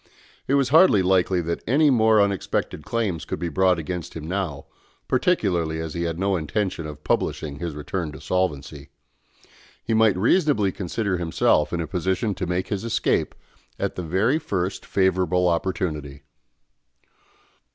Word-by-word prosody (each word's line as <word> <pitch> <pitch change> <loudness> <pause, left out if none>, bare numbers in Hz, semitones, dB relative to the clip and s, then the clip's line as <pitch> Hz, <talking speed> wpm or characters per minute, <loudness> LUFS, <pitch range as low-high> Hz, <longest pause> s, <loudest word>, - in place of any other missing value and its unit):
It 140 - +2
was 135 -3 +2
hardly 155 - +6
likely 90 -1 +2
that 85 0 -3
any 145 +5 +4
more 110 -3 +4
unexpected 100 -6 -1
claims 105 -8 -2
could - - -4
be 85 - -3
brought 95 +3 +2
against 85 +1 -5
him 80 -1 -6
now, 90 -6 -3 0.4
particularly 95 - +1
as 80 -1 -5
he 85 0 -2
had 85 -1 -3
no 95 +1 +1
intention 85 0 -2
of 75 0 -10
publishing 75 -1 -1
his 85 -3 -4
return 75 +2 -4
to - - -9
solvency. 75 -6 -2 0.9
He 115 - -1
might 110 -4 +4
reasonably 115 - +2
consider 95 +1 -2
himself 80 -3 +2
in 85 - -1
a - - -2
position 95 +5 -1
to 90 -1 -4
make 90 +1 -2
his 100 -1 -2
escape 115 - 0 0.4
at - - -2
the - - -5
very 95 - +1
first 95 - -3
favourable 90 -1 +2
opportunity. 80 -5 -2
90 Hz, 150 wpm, -23 LUFS, 80-105 Hz, 0.9 s, hardly